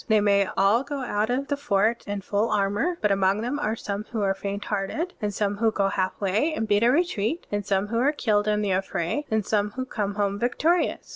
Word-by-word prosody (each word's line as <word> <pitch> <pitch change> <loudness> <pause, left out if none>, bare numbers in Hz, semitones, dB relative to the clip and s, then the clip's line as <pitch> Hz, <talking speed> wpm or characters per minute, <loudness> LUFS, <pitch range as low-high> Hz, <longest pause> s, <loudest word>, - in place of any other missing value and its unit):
They 220 -2 +4
may 200 -1 +3
all 200 +5 +4
go 280 0 -5
out 215 -3 -1
of 265 +3 -1
the^fort 235 -6 0
in 205 0 -3
full 205 +3 0
armor; 210 - 0
but 210 - +2
among 195 +1 +2
them 250 +5 -2
are 225 -7 -1
some 205 -2 -4
who 225 -4 -3
are 195 -1 +2
faint 200 +1 -5
hearted, 215 - -2
and 210 -1 -1
some 205 0 -1
who 225 +1 +3
go 200 -2 0
halfway 200 - 0
and 225 - -2
beat 205 0 +3
a 235 - +5
retreat, 315 - 0
and 205 0 -1
some 195 0 0
who 230 +1 0
are 275 +4 +3
killed 215 -8 +1
in 210 0 +1
the 200 - 0
affray, 190 - -1
and 220 -2 0
some 210 -1 +1
who 260 0 -3
come 205 -5 -3
home 200 -1 -1
victorious. 310 - 0
210 Hz, 225 wpm, -25 LUFS, 200-245 Hz, -, a